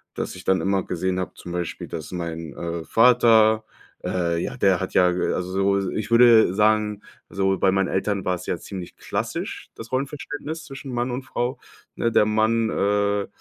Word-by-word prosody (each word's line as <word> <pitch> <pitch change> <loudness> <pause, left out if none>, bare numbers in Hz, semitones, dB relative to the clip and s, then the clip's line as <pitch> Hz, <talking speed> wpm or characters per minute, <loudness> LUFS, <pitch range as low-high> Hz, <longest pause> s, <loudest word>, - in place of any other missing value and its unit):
dass - - -4
ich 90 - -11
dann 95 0 +2
immer 95 -1 +1
gesehen 95 +1 -2
habe, 90 - -4
zum 85 - -9
Beispiel, 90 -2 -4
dass 80 0 -6
mein, 85 -3 -5
äh, 85 -1 -4
Vater, 115 -2 +5 0.4
äh, 85 -2 -1
ja, - - -3
der 95 -3 +3
ha, 95 - -2
ja, 90 -1 +4
äh, 90 - 0
also 90 0 -3 0.3
so, 95 - -2
ich 110 +2 -4
würde 115 -5 +6
sagen 105 0 +2 0.3
so 95 0 0
bei 95 - +3
meinen 95 -1 +1
Eltern 100 0 -1
war's 90 -1 -2
ja - - -1
ziemlich 95 -1 -8
klassisch, - - -4
das 115 - -10
Rollenverständnis 145 +4 -4
zwischen 135 -1 -8
Mann 120 +1 -1
und 125 +2 -4
Frau, 125 0 -3 0.4
ne? 115 - 0
Der 105 - +4
Mann, 110 +1 +2
äh, 100 0 +1
100 Hz, 185 wpm, -23 LUFS, 90-115 Hz, 0.4 s, würde